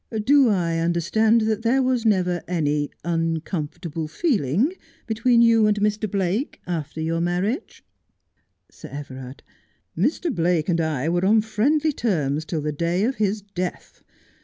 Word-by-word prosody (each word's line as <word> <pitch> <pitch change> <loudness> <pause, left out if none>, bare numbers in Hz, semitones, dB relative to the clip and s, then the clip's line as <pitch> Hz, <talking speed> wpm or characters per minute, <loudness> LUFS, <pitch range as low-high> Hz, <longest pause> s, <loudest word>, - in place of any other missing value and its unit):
Do 275 0 +5
I 170 -5 0
understand 175 +7 +2
that 220 0 0
there 250 +4 +2
was 250 -3 +1
never 180 -4 +1
any 150 -4 0 0.2
uncomfortable 165 -1 -3
feeling 215 - 0 0.3
between 235 +1 +3
you 225 -2 +5
and 210 0 +1
Mr. 210 +1 0
Blake 195 - -1
after 160 -3 -4
your 165 +1 -1
marriage 185 - -2 0.9
1 - - -31
Sir - - -11
Everard: 130 -2 -9 0.5
Mr. 280 - 0
Blake 170 -1 +1
and 170 -1 +2
I 155 -3 -1
were 175 +2 +1
on 215 +3 +4
friendly 285 +9 +1
terms 155 - -1
till 155 0 -3
the 150 +1 -2
day 170 +5 0
of 255 +3 0
his 210 -1 0
death. 185 -3 -6
180 Hz, 145 wpm, -23 LUFS, 165-225 Hz, 0.9 s, Do